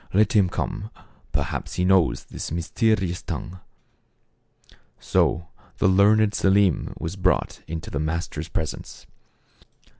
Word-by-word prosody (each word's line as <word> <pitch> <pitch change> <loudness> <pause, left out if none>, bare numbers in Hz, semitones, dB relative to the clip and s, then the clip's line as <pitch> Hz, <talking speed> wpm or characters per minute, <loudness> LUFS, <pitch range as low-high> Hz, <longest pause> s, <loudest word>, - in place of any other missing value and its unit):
Let 110 +5 +4
him 100 -4 +5
come; 105 +3 -3 0.4
perhaps - - -3
he 90 - +1
knows 95 -4 +3
this - - -7
mysterious 90 +2 0
tongue." 90 +2 -6 1.4
So 85 0 +1 0.3
the - - +3
learned 105 +2 +4
Selim 95 -3 +2
was 80 +4 -4
brought 90 -1 0
into 80 0 -6
the 70 - -2
master's 80 0 -3
presence. 80 0 -5
95 Hz, 115 wpm, -24 LUFS, 85-100 Hz, 1.4 s, him